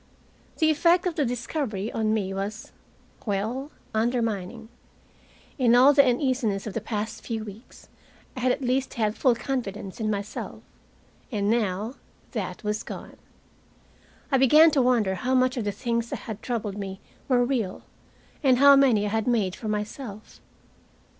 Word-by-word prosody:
The 315 -1 +4
effect 340 +4 +3
of 360 - 0
the 300 -3 0
discovery 235 -3 -3
on 220 -1 0
me 200 -3 -1
was 200 +3 -5 0.6
well 220 +8 -2 0.2
undermining. 225 -2 -1 0.9
In 240 -2 +5
all 260 +4 +7
the 280 0 +7
uneasiness 250 -6 0
of 215 - -5
the 225 - -2
past 215 +1 -4
few 225 -2 -3
weeks 215 +3 -12 0.5
I - - -5
had 255 0 +2
at 270 - -2
least 260 +2 0
had 215 -3 0
full 255 -3 +3
confidence 220 -7 -4
in 215 -1 -1
myself. 205 0 -5 0.7
And 205 -2 0
now 220 +2 -1 0.3
that - - -4
was 210 +1 -1
gone. - - -9 1.1
I 270 - +4
began 305 +5 +7
to 285 -3 +3
wonder 240 -6 +2
how 250 +7 -1
much 255 0 +3
of 235 -4 -2
the 205 - 0
things 235 +2 -2
that - - -3
had 220 -2 -6
troubled 210 -5 -3
me 195 -1 -5 0.3
were 245 -2 +3
real, 235 -8 -2 0.6
and 260 -4 +4
how 280 +1 +8
many 250 -7 +4
I - - -1
had 220 +2 -1
made 210 -7 +1
for 220 - -7
myself. 210 +1 -5
230 Hz, 160 wpm, -26 LUFS, 210-255 Hz, 1.1 s, how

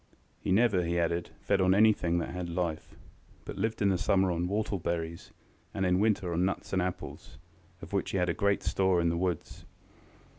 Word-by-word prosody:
He - - -3
never, 100 -2 +3
he 85 +1 -1
added, 85 0 0
fed 100 -1 +1
on 95 0 +4
anything 100 -5 +3
that 85 - -2
had 90 -1 -4
life, 85 -2 -3 0.5
but - - -7
lived 110 +1 -1
in 100 - +4
the 95 -2 +1
summer 95 -1 +2
on 85 +1 -1
whortle 100 0 -1
berries, 85 0 -3 0.5
and 95 - 0
in 90 0 +2
winter 100 -4 +1
on 85 +2 +1
nuts 95 +1 -2
and 95 - +2
apples, 90 -4 -5 0.5
of - - -10
which 100 - 0
he - - -1
had 90 -1 +1
great 100 -1 +1
store 95 -2 +2
in 85 0 +2
the 85 - 0
woods. 90 0 -3
90 Hz, 195 wpm, -30 LUFS, 85-100 Hz, 0.5 s, on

